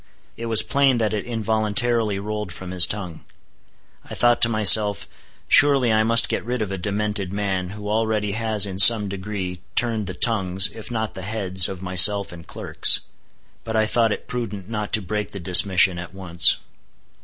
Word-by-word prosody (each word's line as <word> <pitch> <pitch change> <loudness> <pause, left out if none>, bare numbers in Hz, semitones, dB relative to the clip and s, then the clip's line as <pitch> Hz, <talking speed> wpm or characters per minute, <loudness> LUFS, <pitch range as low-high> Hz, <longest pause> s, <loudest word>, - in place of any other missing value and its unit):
It 115 - -8
was 110 -1 +2
plain 140 -3 0
that 110 -2 -2
it 105 - -5
involuntarily 110 -1 -2
rolled 105 -1 -7
from 90 +1 -9
his 90 -2 +4
tongue. 90 -6 -8 0.8
I - - -11
thought 120 -1 +1
to 115 - +2
myself, 105 -1 +5 0.4
surely 135 -5 +3
I 110 - +1
must 115 +1 +1
get - - -4
rid 120 -1 -4
of 100 - -8
a 95 - -5
demented 105 0 -4
man, 95 -3 -4
who 105 +1 -10
already 110 -1 -2
has 110 -1 0
in 95 -1 -7
some 105 -1 +7
degree 95 -2 -7
turned 115 -4 -1
the 90 - -7
tongues, 95 -4 0
if 110 -1 -11
not 110 -2 -5
the 95 - -9
heads 95 -3 0
of 95 -1 -9
myself 95 +2 +4
and 85 -1 -14
clerks. - - +1 0.6
But 110 - -7
I 110 0 +1
thought 115 0 -1
it - - -7
prudent 105 -6 -7
not 105 -2 -6
to 110 - 0
break 105 +3 -6
the 100 - -7
dismission 90 0 +3
at 90 +1 -11
once. 90 -2 +3
105 Hz, 180 wpm, -20 LUFS, 95-110 Hz, 0.8 s, some